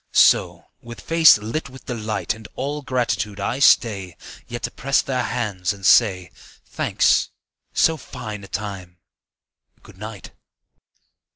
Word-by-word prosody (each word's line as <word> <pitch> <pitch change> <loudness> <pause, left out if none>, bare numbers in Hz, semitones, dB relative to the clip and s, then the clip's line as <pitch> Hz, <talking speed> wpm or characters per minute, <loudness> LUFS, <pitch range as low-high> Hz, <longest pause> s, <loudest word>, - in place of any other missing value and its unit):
So, - - +4 0.2
with 120 0 -10
face 165 -5 +6
lit 115 +8 -4
with 130 0 -14
delight 110 -3 -3
And 110 0 -12
all 145 +2 -3
gratitude, 120 -6 -2
I 110 +6 -2
stay 100 - +3 0.3
Yet 120 0 -7
to - - -2
press 135 +3 0
their 130 -2 -1
hands 105 -6 -2
and 100 -1 -10
say, 95 -8 +4 0.3
"Thanks. - - +1 0.5
So 160 0 +3
fine 115 -7 -8
a - - -10
time! 95 -3 -6 0.9
Good 95 - -17
night. 105 -2 -9
110 Hz, 130 wpm, -22 LUFS, 100-125 Hz, 0.9 s, face